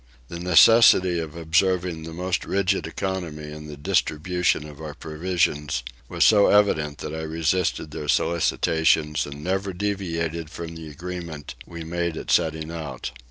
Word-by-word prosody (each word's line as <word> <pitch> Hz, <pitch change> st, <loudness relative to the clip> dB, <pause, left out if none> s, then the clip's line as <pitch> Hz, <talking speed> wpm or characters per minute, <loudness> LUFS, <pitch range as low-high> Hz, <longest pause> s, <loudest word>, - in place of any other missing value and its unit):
The 85 Hz, -, -6 dB
necessity 90 Hz, 0 st, +6 dB
of 80 Hz, -2 st, -6 dB
observing 85 Hz, +1 st, +1 dB
the 80 Hz, -, -7 dB
most 90 Hz, +3 st, -2 dB
rigid 100 Hz, 0 st, 0 dB
economy 85 Hz, -6 st, -4 dB
in 75 Hz, 0 st, -9 dB
the 75 Hz, -1 st, -9 dB
distribution 80 Hz, +2 st, 0 dB
of 75 Hz, 0 st, -12 dB
our 75 Hz, -1 st, -7 dB
provisions 80 Hz, -4 st, -1 dB, 0.3 s
was -, -, +2 dB
so 105 Hz, -2 st, +6 dB
evident 75 Hz, -8 st, +3 dB
that -, -, -5 dB
I 80 Hz, -, -4 dB
resisted 80 Hz, 0 st, -1 dB
their 75 Hz, 0 st, -6 dB
solicitations 80 Hz, -2 st, +1 dB
and 70 Hz, +1 st, -9 dB
never 95 Hz, +2 st, -1 dB
deviated 85 Hz, -5 st, -3 dB
from 85 Hz, 0 st, -7 dB
the 80 Hz, -1 st, -9 dB
agreement 85 Hz, -1 st, -7 dB
we 85 Hz, -1 st, -7 dB
made 85 Hz, 0 st, -2 dB
at -, -, -4 dB
setting 80 Hz, -1 st, +1 dB
out. 75 Hz, -6 st, -6 dB
80 Hz, 150 wpm, -24 LUFS, 75-90 Hz, 0.3 s, necessity